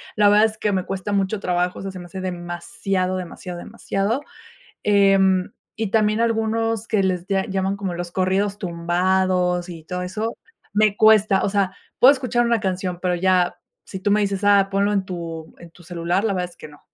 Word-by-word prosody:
La 210 -1 +5
verdad 210 +1 +6
es 215 -1 -3
que 210 - 0
me 185 -1 -1
cuesta 195 +1 -4
mucho 200 +1 0
trabajo, 180 -1 -1
o - - -7
sea, 195 - -4
se 190 - -10
me 175 - -9
hace 185 +2 -7
demasiado, 185 +1 -3
demasiado, 180 0 -7
demasiado, 200 +7 -2 0.6
em, 195 -2 +3 0.2
y 220 -3 -2
también 215 0 +2
algunos 225 -1 0
que 215 -4 +1
les 185 -2 -1
lla 195 -1 0
llaman 195 0 -1
como 195 -3 -4
los 175 0 -5
corridos 195 +2 0
tumbados 180 0 0
y 165 -2 -8
todo 180 +2 -4
eso, 215 +5 -3 0.4
me 210 0 +3
cuesta. 215 -3 +5
O - - +1
sea, 195 -2 0 0.2
puedo 265 +3 +8
escuchar 245 -3 0
una 235 -1 +2
canción, 185 -2 -2
pero, 180 -1 0
ya 180 0 +2 0.3
si 190 - -6
tú 205 - 0
me 210 +1 +4
dices: 200 -1 -1
"Ah, 200 -1 +5
ponlo 200 +1 +1
en 200 -2 +1
tu 165 -3 -7
en 170 - -13
tu 175 - -18
celular, 175 +2 -1
la 210 -3 +1
verdad 180 -1 -2
es - - -19
que - - -10
no. 145 -1 -17
190 Hz, 200 wpm, -22 LUFS, 180-205 Hz, 0.6 s, puedo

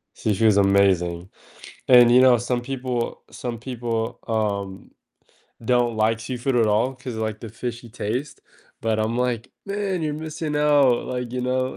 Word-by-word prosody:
Sushi 105 0 -1
is 105 -2 +5
amazing, 95 -3 +2 0.6
and, 120 -2 +7
you 125 - +7
know, 125 -2 +6
some 120 +1 -2
people 125 -2 -3
some 120 -3 -5
people, 115 -2 -3
um, 100 -4 -2 0.7
don't 120 -1 +2
like 110 +1 +1
seafood 125 +2 -2
at 115 -2 +4
all, 110 +5 +1
'cause, 125 -1 -7
like, 110 -1 -3
the 115 - -7
fishy 120 +2 -6
taste, 125 +5 -4 0.4
but 110 -1 0
I'm 110 +2 -1
like, 125 -1 -1
"Man, 200 -3 -2
you're 150 - -1
missing 155 0 -5
out, 145 -4 +3
like, 125 -1 -4
you 125 - -2
know?" 130 +1 -1
120 Hz, 160 wpm, -23 LUFS, 110-130 Hz, 0.7 s, and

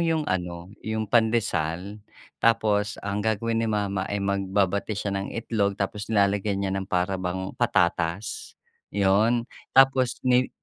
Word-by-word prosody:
yung 165 -2 +1
ano, 90 -2 -3
yung 110 0 -2
pandesal? 105 -5 0 0.4
Tapos, 105 -2 +2
ang 100 0 -1
gagawin 110 +1 0
ni 115 - 0
mama 100 -3 -1
ay 100 - -1
magbabati 100 +1 0
siya 100 -1 -2
ng 100 0 -4
itlog. 105 -4 0
Tapos, 100 +1 -3
nilalagyan 100 -1 +2
niya 95 - -1
ng 95 0 -4
para 90 +1 0
bang 95 +1 -3
patatas, 85 +3 0 0.3
yon. 105 +5 +2 0.3
Tapos, 135 -2 +5
ni 125 0 +3
100 Hz, 135 wpm, -25 LUFS, 95-110 Hz, 0.4 s, Tapos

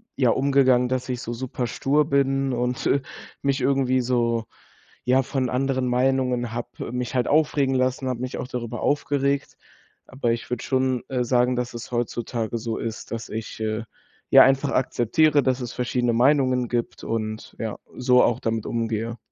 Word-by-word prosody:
ja, 130 -3 +3
umgegangen, 130 -1 +3
dass 130 0 -2
ich 125 -1 -2
so 120 - -4
superstur 130 +4 0
bin 135 -1 +1
und, 125 0 -2
äh, 140 - +3 0.4
mich 140 0 +1
irgendwie 130 -1 +2
so 115 -2 0 0.6
ja, 130 +2 +3
von 130 -1 -1
anderen 130 0 0
Meinungen 125 -1 +1
habe 120 0 -6
mich 125 0 -3
halt 125 - +1
aufregen 145 -3 +2
lassen, 130 +1 0
habe 125 -2 -3
mich 130 0 -4
auch - - -4
darüber 120 -1 -5
aufgeregt. 140 -1 0 0.5
Aber 130 -3 -1
ich 115 - -5
würde 125 -2 -2
schon, 130 -2 0
äh, 125 -2 0
sagen, 125 +1 +2
dass 125 0 -3
es 120 +1 -8
heutzutage 120 -1 -2
so 115 0 -3
ist, 115 -1 -5
dass 115 0 -4
ich, 110 0 -6
äh, 110 +1 -1 0.5
ja, - - +10
einfach 135 +1 +3
akzeptiere, 145 +4 +2
dass 130 0 0
es 120 -1 -5
verschiedene 125 -1 0
Meinungen 130 0 +3
gibt 120 -1 -3
und, 110 -1 -4
ja, 110 -2 -3 0.2
so 125 0 +4
auch 120 0 +2
damit 115 -1 -1
umgehe. 115 0 -2
125 Hz, 170 wpm, -24 LUFS, 120-135 Hz, 0.6 s, ja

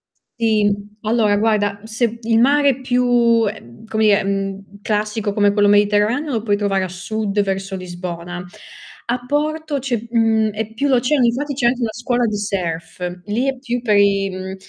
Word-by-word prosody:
S - - -51
sì, 215 -2 +3
mh. 205 +1 -2
Allora 215 -3 +3
guarda, 205 -2 +1
se 230 +1 -1
il 225 0 +2
mare 285 +3 +4
è 265 -1 -1
più 245 -2 +3
ehm, 200 - -9
come 220 0 -1
dire, 205 -2 +4
mhmm, 195 0 -4
classico 210 0 -1
come 205 0 +3
quello 205 -1 +3
Mediterraneo, 210 +8 +2
lo 225 - -1
puoi 205 -3 +1
trovare 195 -2 0
a - - -2
sud 200 +3 -2
verso 195 0 -3
Lisbona. 175 -1 -6 0.6
A 245 +1 -3
Porto 300 +2 -1
c'è 245 -4 -2
mhmm, 225 -2 +2
è 220 +1 -5
più 275 +6 -1
l'oceano, 260 +1 +3
infatti 280 +5 0
c'è 250 -3 +1
anche 245 0 0
una 225 - 0
scuola 245 +1 0
di 215 -2 -1
surf. 180 -2 -4
Lì 225 +6 -1
é 270 -1 -1
più 245 -2 -3
per 215 -4 +2
i 200 -1 +3
mhmm, 185 +1 -6
215 Hz, 185 wpm, -19 LUFS, 200-240 Hz, 0.6 s, mare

